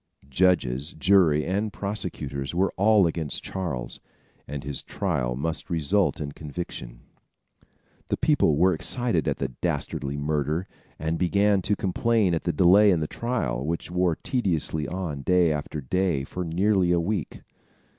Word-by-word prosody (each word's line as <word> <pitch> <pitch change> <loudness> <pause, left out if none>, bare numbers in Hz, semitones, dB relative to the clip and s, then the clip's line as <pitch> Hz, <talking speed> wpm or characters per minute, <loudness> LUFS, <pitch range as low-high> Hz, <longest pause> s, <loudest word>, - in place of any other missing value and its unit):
Judges, 75 -3 +1
jury 80 -3 +3
and 100 +4 -1
prosecutors 75 -10 -4
were 95 +2 +1
all 105 0 +5
against 80 -3 -2
Charles, 70 -11 -4 0.5
and 70 0 -5
his 70 0 -4
trial 75 -11 -2
must 80 +7 -3
result 85 +4 +1
in 75 -2 -4
conviction. 70 -6 -7 1.1
The - - -1
people 145 - +3
were 90 +3 +4
excited 115 - 0
at - - 0
the - - -2
dastardly 70 0 -2
murder, 75 +4 -1 0.3
and 80 +2 -2
began 100 +2 +3
to 105 +3 0
complain 100 0 +1
at 80 - -2
the 85 - +2
delay 95 +6 +6
in 90 -4 +3
the 80 - -1
trial, 115 - -2
which 85 +3 -3
wore 90 -2 +1
tediously 80 - -1
on 85 -6 -4
day 90 +1 +3
after 75 0 -3
day 85 +1 0
for 90 +6 -5
nearly 90 +2 +2
a 85 - +3
week. 90 0 -3
85 Hz, 145 wpm, -25 LUFS, 75-95 Hz, 1.1 s, delay